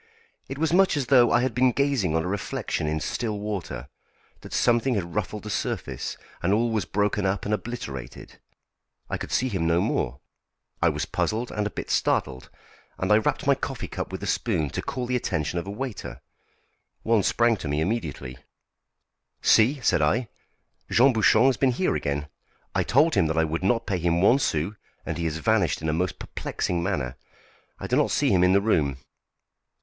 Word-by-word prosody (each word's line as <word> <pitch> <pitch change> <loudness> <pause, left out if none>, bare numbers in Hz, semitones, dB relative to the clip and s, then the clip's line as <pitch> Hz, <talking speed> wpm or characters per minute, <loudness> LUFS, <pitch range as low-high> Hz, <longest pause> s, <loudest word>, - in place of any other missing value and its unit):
It 135 - -5
was 160 +2 0
much 190 -3 +4
as 140 - 0
though 120 -3 +6
I 120 - +4
had 130 -2 0
been 125 +2 +3
gazing 130 - +1
on 80 - +1
a - - -3
reflection 95 -5 -2
in 80 +1 -1
still 110 +5 -2
water; 100 - -5 0.5
that - - -12
something 120 +1 +2
had 85 -4 -3
ruffled 105 0 -3
the 105 - -5
surface, - - -3 0.2
and 85 - +1
all 115 +3 +2
was 110 -2 0
broken 105 0 0
up 95 0 -1
and 105 - 0
obliterated. 100 - -6 0.7
I - - -2
could - - -6
see 130 - +1
him 95 -9 -1
no 85 +1 +3
more. 65 -6 -1 0.6
I - - +5
was - - -2
puzzled 115 +3 -2
and 105 -1 -1
a - - -4
bit - - -6
startled, 65 -1 0 0.5
and 95 - -1
I 105 - +6
rapped 110 - -1
my - - +5
coffee - - -4
cup - - -5
with - - -5
the - - -4
spoon 75 -4 0
to - - -3
call 125 - -4
the 125 +1 -1
attention 85 -7 -1
of 85 - -7
a - - -4
waiter. 100 - -6 0.8
One 115 -2 +3
sprang 120 +4 +3
to 80 - -6
me 75 +1 0
immediately. 80 - -3 1.0
"See!" 130 +6 +4
said 85 - +2
I, 110 +11 +1 0.6
"Jean 130 +3 +5
Bouchon 110 +1 +4
has 135 -2 +3
been 130 -2 +2
here 185 +9 0
again; 70 +1 -2 0.5
I - - +2
told 150 +6 +3
him 80 - +3
that 80 +1 -2
I 80 - +4
would 80 +1 -2
not 115 +4 +1
pay 95 -3 -1
him 85 0 +1
one 115 +9 +5
sou, 80 - 0 0.3
and 85 - -4
he 85 - -1
has 80 -1 -1
vanished 95 -3 +1
in 80 - -2
a - - +1
most 90 +2 -1
perplexing 85 -1 -3
manner. 65 -5 -2 0.6
I - - -7
do - - 0
not - - +3
see - - +2
him 90 -2 +4
in 90 +1 +4
the 100 - +4
room." 75 -11 +1
100 Hz, 200 wpm, -25 LUFS, 80-120 Hz, 1.0 s, though